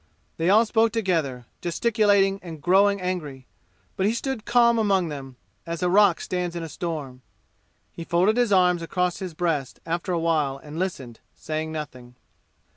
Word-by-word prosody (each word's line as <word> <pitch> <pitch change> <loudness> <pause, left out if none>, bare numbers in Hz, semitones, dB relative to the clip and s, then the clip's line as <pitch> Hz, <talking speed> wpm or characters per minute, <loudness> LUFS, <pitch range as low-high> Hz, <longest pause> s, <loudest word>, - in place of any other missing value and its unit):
They 165 +2 +1
all 215 +4 +6
spoke 225 0 +2
together, 165 - -1 0.2
gesticulating 200 +1 +2
and 165 -3 -9
growing 200 +5 +3
angry; 155 -8 -4 0.5
but 190 - +1
he 220 - +1
stood 265 -2 -4
calm 235 -1 +4
among 195 -5 +2
them, 135 -3 -8 0.3
as 170 +1 -5
a 180 - +2
rock 200 -3 +5
stands 180 -1 -3
in 170 - -4
a 165 - -6
storm. 145 -6 -5 0.7
He 170 - -8
folded 180 +6 +2
his 240 -3 +1
arms 180 -2 +4
across 180 +1 -1
his 185 -4 -6
breast 155 -7 -2
after 170 +3 -2
a 175 - +1
while 155 -5 0
and 150 +3 -9
listened, 135 -11 -4 0.2
saying 155 0 -4
nothing. 125 -6 -8
175 Hz, 165 wpm, -24 LUFS, 155-195 Hz, 0.7 s, all